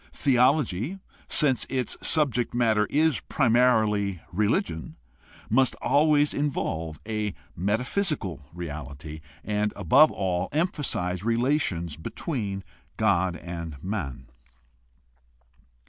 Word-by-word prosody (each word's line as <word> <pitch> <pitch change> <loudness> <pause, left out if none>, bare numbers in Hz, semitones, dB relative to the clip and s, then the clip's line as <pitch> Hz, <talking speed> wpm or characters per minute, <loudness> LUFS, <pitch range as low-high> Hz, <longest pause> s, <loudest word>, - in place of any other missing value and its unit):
Theology, 130 - +2 0.3
since 135 -5 +2
its 130 -3 -1
subject 125 -7 +1
matter 110 -3 +3
is 155 -1 +3
primarily 110 - +2
religion, 90 -4 -1 0.5
must 130 +3 +3
always 150 0 +3
involve 80 - -2
a 105 -2 -2 0.2
meta 105 +7 0
physical 130 - -1
reality, 75 -2 -7 0.2
and 105 0 0
above 130 - +5
all 90 -1 -1
emphasize 130 - -1
relations 115 - 0
between 100 - -4 0.3
God 95 -5 +2
and 85 -3 -6
men. 75 - -4
105 Hz, 90 wpm, -26 LUFS, 90-135 Hz, 0.5 s, above